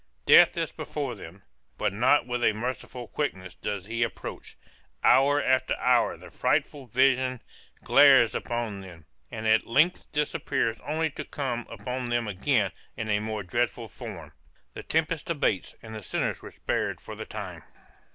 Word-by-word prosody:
Death - - +7
is - - -1
before 140 -4 -4
them, 95 -2 -11 0.3
but 105 -2 0
not 120 +7 +3
with 120 -1 -2
a 110 - +4
merciful 125 +1 -5
quickness 95 - -3
does 100 +2 -4
he 115 +2 -3
approach; 115 - -4 0.5
hour 140 +3 +5
after 130 -2 +2
hour - - +2
the - - -13
frightful 140 -3 0
vision 130 +1 +2 0.4
glares 135 -5 +6
upon 115 -4 -3
them, 85 -4 -12 0.2
and 110 - -6
at 110 0 +3
length 155 +10 +2
disappears 140 -5 -1
only 155 +1 -1
to - - -6
come 125 -4 -4
upon 125 +3 -4
them 120 -1 0
again 105 +1 +1 0.3
in 110 -1 -2
a 105 - +2
more 110 -1 -3
dreadful 120 +3 -1
form. 100 - -9 0.4
The - - -7
tempest 160 0 -1
abates, 140 - 0
and 110 -1 -9
the 110 - -6
sinners 90 - -2
were - - -9
spared - - -2
for - - -9
the - - -7
time. - - -7
120 Hz, 160 wpm, -27 LUFS, 105-135 Hz, 0.5 s, Death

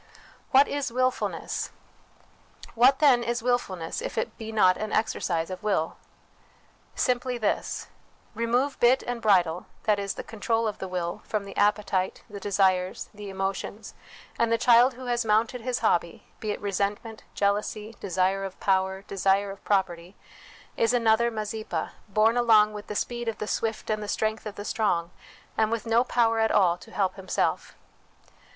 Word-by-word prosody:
What 275 +2 +6
is 285 -3 -2
Wilfulness? 255 +1 -1 1.0
What, 250 +4 +5
then, 270 -5 +5
is 235 0 -2
wilfulness, 195 -9 -1
if - - -5
it - - -2
be 220 -1 -7
not 185 -4 +4
an 215 +2 -4
exercise 180 -6 -1
of 185 - -6
will? 195 -6 0 1.0
Simply 250 0 0
this: 215 -3 -1 0.5
remove 240 +5 0
bit 250 +2 +4
and 245 -1 -4
bridle 180 -5 +2 0.2
that 210 -2 +2
is, 200 -1 -3
the - - -6
control 225 +1 -1
of 210 - -4
the 190 - -4
will 175 -2 -3
from 215 -2 -2
the 195 - -9
appetites, 200 -2 +1
the 205 -3 -8
desires, 190 -2 +1
the 205 -1 -8
emotions, 195 +2 -4 0.5
and 230 -1 +2
the 230 - +4
child 245 +2 +5
who 255 +1 -9
has 240 0 0
mounted 225 +3 +1
his 245 +1 -2
hobby, 170 -1 +1 0.2
be 215 - -4
it 205 - -2
resentment, 205 +3 -2
jealousy, 210 +2 -1
desire 190 +1 0
of 195 -1 -7
power, 190 0 +1
desire 195 0 +1
of 195 - -12
property, 185 -2 -1 0.6
is 230 +1 +2
another 235 0 +3
Mazeppa, 215 -1 -4 0.2
borne 215 +3 +3
along 215 -3 +5
with 210 -1 -8
the 210 - -5
speed 240 +2 -3
of 225 - -2
the - - -4
swift 225 +1 -2
and 215 0 -1
the 210 - -5
strength 220 +1 -1
of 210 - -7
the 205 - -7
strong, 180 -7 0 0.4
and 220 -1 +2
with 230 0 -2
no 230 +1 +3
power 230 -3 +2
at 220 0 +3
all 180 -4 +4
to - - -14
help 195 -3 -1
himself. 190 -1 -1
215 Hz, 165 wpm, -26 LUFS, 195-230 Hz, 1.0 s, What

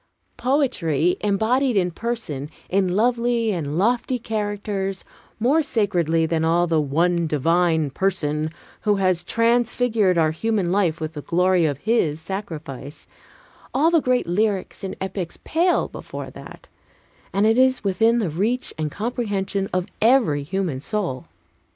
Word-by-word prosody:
Poetry 190 - +1
embodied 220 +5 +1
in 180 -2 +2
persons, 170 - -4 0.2
in 185 -1 +1
lovely 235 0 +1
and 155 -5 -3
lofty 240 +5 +1
characters, 205 -3 -3 0.3
more 270 +8 +3
sacredly 175 - +1
than 160 0 0
all 165 +2 +3
in 175 - -1
the 160 -1 +3
One 170 +4 +1
Divine 160 0 +2
Person 155 -3 -1 0.3
who 210 -1 +2
has 185 -3 +1
transfigured 230 -4 +2
our 160 -2 +3
human 200 +1 -1
life 180 -5 +1
with 160 0 -4
the 150 - -6
glory 180 +1 +2
of 145 -3 -2
His 165 -6 +1
sacrifice, 160 -6 -7 0.7
all 310 +5 +4
the 330 -2 +4
great 255 -1 +1
lyrics 200 +2 -1
and 190 - -4
epics 190 -2 -4
pale 345 +3 +2
before - - -8
that, - - -12 0.6
and 200 +2 +2
it 225 +3 +4
is 260 -2 +3
within 225 +4 +3
the 205 -9 0
reach 220 +10 -1
and 155 -1 -1
comprehension 205 - -2
of 185 -1 0 0.2
every 220 - +4
human 165 -3 -2
soul. 175 - -2
195 Hz, 140 wpm, -22 LUFS, 165-230 Hz, 0.7 s, all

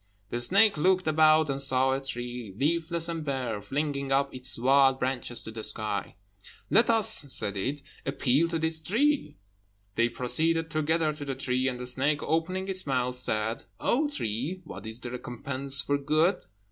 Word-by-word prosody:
The 120 - -2
snake 195 - +4
looked 185 +3 +3
about 155 0 +5
and 140 -1 -2
saw 130 -1 +2
a 135 +1 -1
tree, 120 -5 -5
leafless 165 +4 +1
and 165 -2 -3
bare, 130 -7 -2
flinging 140 +1 -2
up 140 0 +2
its 130 0 -3
wild 135 +2 +4
branches 125 -2 -2
to 110 - -7
the 110 0 -7
sky. 105 -2 -2 0.6
"Let 230 +1 +4
us," 220 -7 +2
said 100 -5 0
it, 135 +9 -3 0.2
"appeal 135 +3 +1
to 165 - -1
this 160 0 0
tree." 235 - +1 0.6
They 115 +3 +2
proceeded 160 +7 0
together 155 0 +1
to 150 0 -8
the 135 -2 -3
tree; 130 0 0
and 125 -2 -2
the 125 - -5
snake, 140 +4 +1
opening 185 +4 -1
its 185 -4 -2
mouth, 125 -2 0
said, 110 -2 -1
"O 290 +5 +1
tree, 150 - -3
what 155 - -9
is 110 +1 -6
the 125 -1 -6
recompense 130 +2 -1
for 145 0 0
good?" 155 +6 +1
140 Hz, 170 wpm, -28 LUFS, 125-160 Hz, 0.6 s, about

